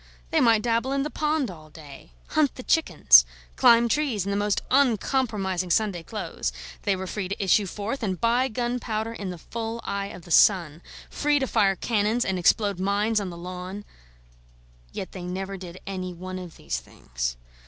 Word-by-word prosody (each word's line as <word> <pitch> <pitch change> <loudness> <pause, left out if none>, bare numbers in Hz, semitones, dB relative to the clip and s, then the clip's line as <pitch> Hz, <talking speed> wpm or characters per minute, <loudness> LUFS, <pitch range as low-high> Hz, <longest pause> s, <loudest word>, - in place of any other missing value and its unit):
They 320 - +3
might 225 -4 +4
dabble 235 +3 0
in 275 0 +1
the 300 - -4
pond 300 -6 0
all 155 -3 -13
day, 145 - -13 0.2
hunt 305 -3 +2
the 255 - -8
chickens, 155 - +6 0.3
climb 235 - +6
trees 245 -7 0
in 200 - -2
the - - 0
most 205 0 0
uncompromising 220 -8 +1
Sunday 195 -1 +1
clothes; 105 - -4 0.3
they 200 - +1
were 190 0 -5
free 190 0 -4
to 200 +1 -3
issue 195 +1 +3
forth 210 +8 -4
and 190 -5 -2
buy 240 +3 +2
gunpowder 235 -2 -2
in 200 -4 -5
the 180 - -6
full 225 +6 -5
eye 200 0 -3
of 180 - -10
the 175 - -12
sun 170 -3 +4 0.3
free 295 0 +1
to 270 - +1
fire 205 -6 +2
cannons 220 +3 0
and 190 -1 -1
explode 200 +1 +2
mines 205 +3 +1
on 195 - -4
the 170 - -8
lawn: 185 +3 -7 1.1
yet 190 - -6
they 185 - -8
never 190 +2 -4
did 185 -1 -9
any 185 -2 -5
one 185 +1 -6
of 175 -3 -10
these - - -3
things. - - -5
200 Hz, 185 wpm, -25 LUFS, 180-230 Hz, 1.1 s, chickens